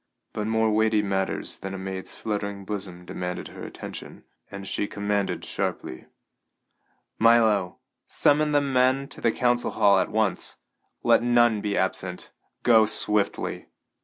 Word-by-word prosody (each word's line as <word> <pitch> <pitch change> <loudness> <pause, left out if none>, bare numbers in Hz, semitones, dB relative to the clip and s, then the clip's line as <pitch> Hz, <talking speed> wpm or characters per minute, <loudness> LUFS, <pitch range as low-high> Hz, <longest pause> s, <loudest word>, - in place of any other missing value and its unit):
But 105 0 -3
more 110 0 +2
weighty 110 0 +2
matters 95 -1 -2
than 95 0 -5
a - - -5
maid's 95 0 -6
fluttering 100 -2 -4
bosom 95 -3 -5
demanded 90 0 -5
her - - -10
attention, - - -9 0.3
and 100 -1 -8
she 100 - -2
commanded 100 0 -2
sharply: 65 - -4 1.1
"Milo, 110 -5 +4 0.3
summon 150 +1 +3
the 145 -1 +3
men 135 0 +2
to - - -11
the - - +3
council 120 0 +1
hall 100 -2 +4
at 95 - 0
once. 110 -3 -1 0.5
Let - - +5
none 120 -3 +3
be 100 -1 -1
absent. 95 -1 -2 0.3
Go 110 -3 +6
swiftly!" 105 -1 0
105 Hz, 135 wpm, -25 LUFS, 95-115 Hz, 1.1 s, Go